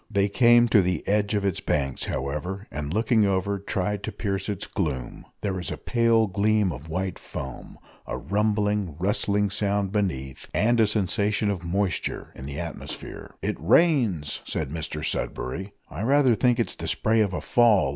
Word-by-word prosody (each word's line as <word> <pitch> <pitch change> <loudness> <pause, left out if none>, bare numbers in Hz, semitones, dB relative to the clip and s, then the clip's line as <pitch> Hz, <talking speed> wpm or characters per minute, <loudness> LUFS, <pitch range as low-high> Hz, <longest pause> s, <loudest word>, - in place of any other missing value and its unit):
They 100 -1 +2
came 120 +2 +5
to 105 - +6
the 90 -3 -1
edge 105 +1 +1
of 100 -1 0
its 95 -4 0
banks, 70 -3 -1
however, 75 +9 -3
and, 75 -1 -4
looking 110 +2 +3
over, 100 +1 0
tried 100 +1 -2
to - - -4
pierce 100 -2 -3
its 100 -4 -2
gloom. 70 -9 -3 0.2
There 100 -2 -1
was 90 -2 -4
a - - -4
pale 115 -2 +3
gleam 105 0 +2
of 75 +2 -8
white 95 +2 -2
foam 65 -2 -8 0.3
a - - -3
rumbling, 105 -3 0
rustling 100 +2 +1
sound 100 -1 0
beneath, 75 -11 -2
and 120 +3 +3
a 110 - +5
sensation 105 +1 +1
of 90 -3 -4
moisture 95 +2 -2
in 65 - -8
the 70 +1 -5
atmosphere. 85 -2 -7
"It - - -1
rains!" 110 - +3
said 75 -3 -3
Mr 75 -2 -3
Sudberry. 90 +11 -3 0.2
"I - - -7
rather 135 +1 +4
think 120 +1 +2
it's - - 0
the - - -6
spray 110 +1 +2
of 100 -3 +1
a 90 - -2
fall!" 110 - +4
100 Hz, 175 wpm, -25 LUFS, 85-105 Hz, 0.3 s, to